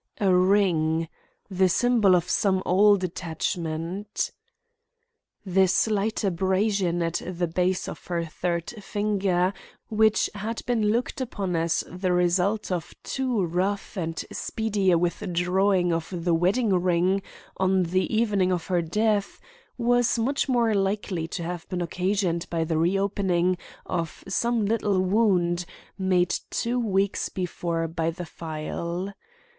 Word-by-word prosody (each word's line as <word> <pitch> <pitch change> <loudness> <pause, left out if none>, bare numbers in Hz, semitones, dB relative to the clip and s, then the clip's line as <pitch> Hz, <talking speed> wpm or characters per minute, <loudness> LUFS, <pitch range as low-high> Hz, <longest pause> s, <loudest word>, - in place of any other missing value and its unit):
A 195 -3 +3
ring! 175 -4 +3 0.4
the 190 -1 +2
symbol 220 -1 +4
of 175 0 +1
some 190 0 +1
old 200 +1 +4
attachment. 170 +2 -3 1.1
The 190 0 +3
slight 215 +3 +1
abrasion 190 -1 +1
at 165 0 -1
the 180 -1 -2
base 180 +2 0
of - - -8
her 170 -2 -1
third 170 +1 -3
finger, 195 -3 0 0.4
which 220 0 +3
had 215 +3 -5
been 230 -3 +1
looked 240 +4 -1
upon 200 -8 -3
as 165 0 +1
the 180 +1 -2
result 180 +4 +1
of 175 -3 -3
too 255 -6 -1
rough 190 +6 -2
and 165 -3 -3
speedy 210 -4 -1
a 175 - +5
withdrawing 180 +1 +1
of 165 +2 -3
the 175 -1 0
wedding 195 +6 +2
ring 180 +2 +2 0.4
on 190 0 +2
the 185 +2 0
evening 210 -5 +2
of 175 -2 -1
her 180 -2 +1
death, 205 +4 0 0.4
was 245 0 +2
much 270 +5 0
more 235 -3 +3
likely 195 -4 -1
to 170 +1 -5
have 175 0 -5
been 180 -2 -2
occasioned 180 0 -1
by 165 -1 0
the 160 -1 -1
reopening 185 0 +1 0.3
of 165 -3 -4
some 235 -2 +1
little 205 -2 +1
wound 185 -3 +2 0.3
made 185 -2 +1 0.2
two 240 +2 -1
weeks 200 -3 0
before 170 -2 -2
by 165 0 -1
the 175 +2 -6
file. 170 +4 -5
185 Hz, 130 wpm, -26 LUFS, 175-205 Hz, 1.1 s, a